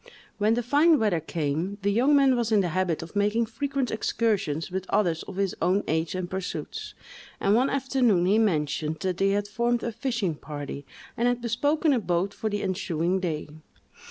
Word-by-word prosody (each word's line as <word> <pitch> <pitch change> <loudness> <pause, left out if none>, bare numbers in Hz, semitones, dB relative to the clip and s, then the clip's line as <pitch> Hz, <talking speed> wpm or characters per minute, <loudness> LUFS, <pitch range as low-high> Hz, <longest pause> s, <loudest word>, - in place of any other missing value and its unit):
When 215 +2 +3
the 240 - -1
fine 295 +6 +4
weather 210 -9 +1
came, 160 +4 -2
the 200 - +2
young 255 +8 +4
man 275 -2 +5
was 235 -2 -1
in 210 -2 +5
the 180 - -1
habit 175 -1 -1
of 165 - -12
making 210 +3 +2
frequent 270 +3 -2
excursions 205 -8 -1
with 190 0 -4
others 170 -6 +1
of 190 - -8
his 195 -1 0
own 190 +3 +2
age 160 +3 -1
and 185 -1 -3
pursuits; 190 0 -5 0.4
and 200 - +2
one 250 +5 +3
afternoon 255 -9 +2
he 205 +4 +3
mentioned 155 -6 0
that 185 -2 -1
they 195 +1 +2
had 205 +1 0
formed 235 +2 0
a 235 - -2
fishing 230 - -2
party, 145 -2 -7 0.3
and 235 - +1
had 245 0 +1
bespoken 285 +7 +1
a 250 - +2
boat 180 0 -1
for 220 - -3
the 205 -1 -2
ensuing 180 -1 -1
day. 165 -5 -3
200 Hz, 190 wpm, -26 LUFS, 175-235 Hz, 0.4 s, man